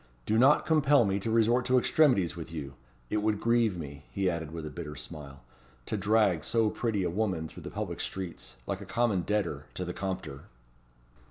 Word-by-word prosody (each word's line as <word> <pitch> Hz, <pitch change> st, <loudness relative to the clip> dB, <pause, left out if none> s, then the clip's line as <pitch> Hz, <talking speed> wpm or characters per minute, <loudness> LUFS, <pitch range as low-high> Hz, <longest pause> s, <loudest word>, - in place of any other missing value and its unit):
Do 110 Hz, -, +1 dB
not 135 Hz, +4 st, +5 dB
compel 145 Hz, -5 st, +4 dB
me 100 Hz, 0 st, 0 dB
to 105 Hz, -, -3 dB
resort 115 Hz, +2 st, +3 dB
to 130 Hz, 0 st, +3 dB
extremities 125 Hz, -, +3 dB
with 80 Hz, -1 st, -7 dB
you. 70 Hz, -4 st, -6 dB, 0.4 s
It -, -, +1 dB
would 105 Hz, -1 st, +1 dB
grieve 115 Hz, -5 st, +2 dB
me," 70 Hz, -2 st, -8 dB
he 95 Hz, -2 st, 0 dB
added 80 Hz, -2 st, -4 dB
with 80 Hz, 0 st, -6 dB
a 75 Hz, -, -6 dB
bitter 75 Hz, -2 st, -6 dB
smile, 70 Hz, -1 st, -9 dB, 0.4 s
"to -, -, -2 dB
drag 105 Hz, -5 st, +2 dB
so 115 Hz, -2 st, +2 dB
pretty 110 Hz, -5 st, -1 dB
a 90 Hz, -, 0 dB
woman 90 Hz, -5 st, -1 dB
through -, -, -12 dB
the -, -, -7 dB
public -, -, -4 dB
streets, 95 Hz, -9 st, -5 dB
like -, -, -3 dB
a -, -, -7 dB
common 115 Hz, -6 st, +1 dB
debtor, 85 Hz, -7 st, -1 dB
to 90 Hz, -, -3 dB
the 90 Hz, -, -4 dB
Compter." 95 Hz, -8 st, -5 dB
95 Hz, 195 wpm, -29 LUFS, 80-115 Hz, 0.4 s, not